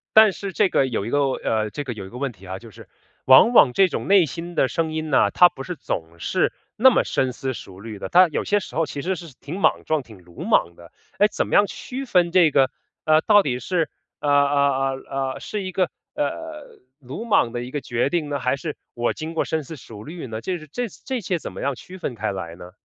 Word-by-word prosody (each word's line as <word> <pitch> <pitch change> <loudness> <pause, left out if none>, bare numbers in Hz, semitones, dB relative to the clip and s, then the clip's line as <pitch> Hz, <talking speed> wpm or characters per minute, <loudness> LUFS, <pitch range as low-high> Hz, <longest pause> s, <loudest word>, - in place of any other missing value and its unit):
但 220 -1 +8
是 195 0 -6
这 205 0 +3
个 135 - +2
有 115 -5 -2
一 - - -4
个 145 - +1
呃， 110 -5 -1
这 145 - -4
个 130 - -5
有 105 -5 -7
一 - - -10
个 120 - -9
问 135 0 -2
题 95 -4 -16
哈， 95 +1 -5
就 115 +2 -13
是 - - -14 0.4
往 130 - +8
往 140 - +6
这 190 +4 +4
种 - - -4
内 195 -3 +6
心 165 +5 -7
的 130 - +2
声 160 +5 -1
音 155 0 -3
呢， - - +4
它 180 - +6
不 135 - -11
是 180 +6 -5
总 85 - -5
是 - - 0 0.2
那 260 +4 +8
么 255 - +2
深 130 -1 -1
思 130 +1 -3
熟 95 -5 -11
虑 110 -2 -8
的。 - - -4
它 180 0 +6
有 - - -2
些 205 0 +2
时 145 - -8
候 165 - +2
其 145 -1 -6
实 185 +4 -2
是 165 -4 -10
挺 170 +7 -6
莽 - - +2
撞、 155 -3 0
挺 105 -7 -15
鲁 85 -1 -10
莽 85 0 +2
的。 85 0 -15 0.3
诶， 205 - +6
怎 - - -2
么 - - -6
样 205 - +5
区 265 +6 -6
分 180 -7 +2
这 175 -3 +5
个， 135 -2 +3 0.3
呃， 155 0 +5
到 205 -1 +6
底 125 -3 -1
是， 165 +5 -1 0.3
呃 145 - 0
呃 140 -2 +2
呃 135 0 -1
呃， - - -9
是 210 - -4
一 185 -1 -5
个， 185 -3 +1 0.2
呃， 300 - -5 0.2
鲁 140 - -7
莽 200 - +3
的 120 0 -4
一 125 - -6
个 145 +2 -4
决 120 +2 -1
定 160 -3 -1
呢， 140 -1 -2
还 130 0 +1
是 150 +2 -6 0.2
我 120 0 0
经 160 +1 -6
过 165 - +1
深 160 -2 -2
思 160 - -8
熟 115 -6 -11
虑 165 -2 -7
呢？ 110 -1 -5
这 180 +9 -3
是 155 - -13
这 245 +5 -2
这 255 +5 -5
些 185 -4 -2
怎 - - -7
么 - - -9
样 140 -1 -1
区 185 +9 -11
分 140 -9 -4
开 110 -1 -2
来 90 -4 -6
呢？ 90 +1 -11
145 Hz, 280 characters per minute, -23 LUFS, 120-180 Hz, 0.4 s, 但